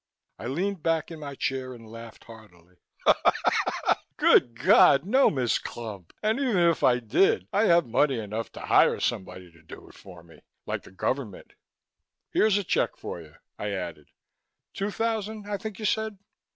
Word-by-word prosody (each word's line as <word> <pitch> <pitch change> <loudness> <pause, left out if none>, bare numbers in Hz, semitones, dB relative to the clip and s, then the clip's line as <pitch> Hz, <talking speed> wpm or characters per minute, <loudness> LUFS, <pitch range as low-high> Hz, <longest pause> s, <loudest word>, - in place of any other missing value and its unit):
I 120 - -6
leaned 180 +7 -2
back 165 0 0
in 165 - -8
my 140 -2 -7
chair 130 -1 -3
and 115 -1 -14
laughed 115 0 -11
heartily. 95 -6 -16 1.4
"Good 115 -1 +4
Lord, 140 +3 +6
no! 260 +7 +4
Miss 125 -5 0
Clump. 105 -7 -8
And 220 +4 +1
even 255 -8 +1
if 170 -3 +3
I 125 -1 +5
did 125 - +2
I 205 +3 +3
have 170 -3 +4
money 135 +3 +1
enough 110 +1 -5
to - - -9
hire - - +3
somebody 90 -1 -4
to 85 0 -21
do 80 - -13
it - - -17
for 90 -3 -14
me 85 -1 -18 0.3
like - - -3
the - - -16
government. 105 +2 -4 0.8
Here's 215 -2 +3
a 205 - -1
check - - 0
for 85 - -7
you," 75 -2 -16 0.2
I 105 -1 -3
added. 85 -6 -6 0.6
"Two 200 +1 -2
thousand, 220 -1 -3
I 205 -1 -2
think 205 0 -7
you 215 - -5
said." 220 0 -1
130 Hz, 170 wpm, -26 LUFS, -, 1.4 s, Lord